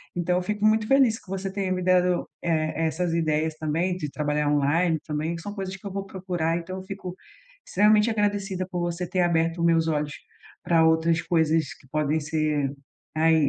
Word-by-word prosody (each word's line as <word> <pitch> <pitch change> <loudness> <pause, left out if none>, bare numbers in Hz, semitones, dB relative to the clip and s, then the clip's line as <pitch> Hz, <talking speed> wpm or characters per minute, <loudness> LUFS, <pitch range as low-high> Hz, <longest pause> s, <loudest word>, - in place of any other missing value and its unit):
Então 180 +1 +1
eu - - 0
fico 210 +2 -3
muito 215 0 +3
feliz 260 -5 +4
que - - -24
você 195 0 -3
tenha 195 -1 -2
me 185 - -1
dado, 180 -1 +2
eh 170 - -3 0.3
eh, - - +3
essas 175 +1 -1
ideias 160 -1 0
também 165 +4 -1
de 150 -5 -4
trabalhar 150 0 -1
online 155 +3 +2
também, 155 +2 -2
que 165 - -7
são 205 +4 -6
coisas 190 -1 -4
que 200 +2 -15
eu - - -6
vou 195 0 -3
procurar, 180 -4 -2
então 185 +3 -7
eu 185 - -7
fico 190 -2 -7 0.5
extremamente 210 +3 +4
agradecida 200 -3 -1
por 180 - -3
você 175 0 -2
ter 185 - +1
aberto 165 0 +1
meus 165 -1 +3
olhos 150 -2 -1 0.5
pra 165 -1 +4
outras 160 +1 +3
coisas 160 -3 +1
que 135 - -21
podem 155 +1 +1
ser, 150 -2 0 0.4
ai, 160 +1 +4
170 Hz, 195 wpm, -25 LUFS, 160-190 Hz, 0.5 s, feliz